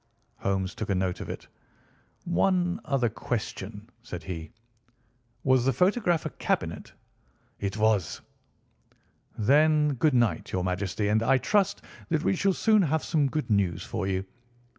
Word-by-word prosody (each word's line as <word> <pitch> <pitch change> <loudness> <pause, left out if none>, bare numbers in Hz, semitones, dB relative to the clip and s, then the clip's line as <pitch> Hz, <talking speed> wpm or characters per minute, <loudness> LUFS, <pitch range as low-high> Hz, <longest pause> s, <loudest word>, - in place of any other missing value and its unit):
Holmes 95 -1 -1
took 110 - -5
a 100 - +2
note 90 -1 -1
of - - -6
it. - - -7 0.8
"One 180 +1 +1
other 135 -4 +1
question," 105 -2 -4
said 90 -8 -7
he. 80 -4 -6 0.9
"Was 130 -2 +4
the 135 +1 +2
photograph 180 - +2
a - - -3
cabinet?" - - -2 0.7
"It 100 +1 -3
was." 105 -5 +1 1.2
"Then, 150 +6 +4
good 135 +2 +2
night, 115 -9 +1
your 90 - -1
Majesty, 95 +2 -1
and 110 +1 +3
I 130 +4 +4
trust 200 +7 +1 0.3
that 160 -2 +1
we - - +2
shall 195 +1 +2
soon 215 +2 +4
have 160 -2 +1
some 150 -4 +1
good 150 -4 -2
news 90 -4 +1
for 95 - -3
you. 95 0 -1
120 Hz, 145 wpm, -27 LUFS, 95-160 Hz, 1.2 s, Was